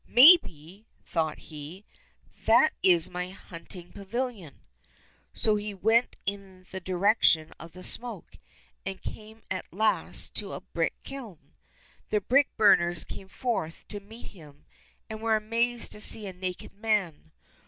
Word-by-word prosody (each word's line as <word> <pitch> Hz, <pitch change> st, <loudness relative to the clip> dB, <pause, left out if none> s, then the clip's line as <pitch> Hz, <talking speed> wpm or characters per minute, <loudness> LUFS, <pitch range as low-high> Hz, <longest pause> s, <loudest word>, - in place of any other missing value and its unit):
" -, -, -30 dB
Maybe," 220 Hz, -, +5 dB, 0.2 s
thought 160 Hz, -2 st, -2 dB
he, 155 Hz, +6 st, -10 dB, 0.3 s
'' -, -, -31 dB
that 240 Hz, +8 st, +5 dB
is 175 Hz, -3 st, +4 dB
my 180 Hz, 0 st, -4 dB
hunting 175 Hz, -1 st, -10 dB
pavilion." 205 Hz, -, -6 dB, 0.7 s
So 215 Hz, -2 st, 0 dB
he 205 Hz, 0 st, -6 dB
went 225 Hz, +5 st, +2 dB
in 195 Hz, -2 st, -6 dB
the 190 Hz, -, -5 dB
direction 180 Hz, -3 st, +2 dB
of 165 Hz, 0 st, -12 dB
the 185 Hz, +1 st, -12 dB
smoke, 235 Hz, -7 st, +2 dB, 0.4 s
and 190 Hz, 0 st, -6 dB
came 220 Hz, +1 st, -10 dB
at 185 Hz, -, -5 dB
last 215 Hz, +3 st, +2 dB
to -, -, +1 dB
a -, -, -7 dB
brick -, -, -3 dB
kiln. 235 Hz, -, -11 dB, 0.6 s
The 210 Hz, -, +1 dB
brick 265 Hz, +7 st, +3 dB
burners 175 Hz, -5 st, +4 dB
came 195 Hz, -, -10 dB
forth 205 Hz, -9 st, -4 dB
to 205 Hz, -, -7 dB
meet 220 Hz, +4 st, -13 dB
him, 150 Hz, -7 st, -17 dB, 0.4 s
and 220 Hz, 0 st, -8 dB
were 225 Hz, -1 st, +2 dB
amazed 230 Hz, +2 st, -1 dB
to 210 Hz, -, -8 dB
see 215 Hz, 0 st, +5 dB
a 190 Hz, -, -7 dB
naked 180 Hz, +1 st, -7 dB
man. 200 Hz, -7 st, -2 dB
200 Hz, 145 wpm, -27 LUFS, 175-225 Hz, 0.7 s, Maybe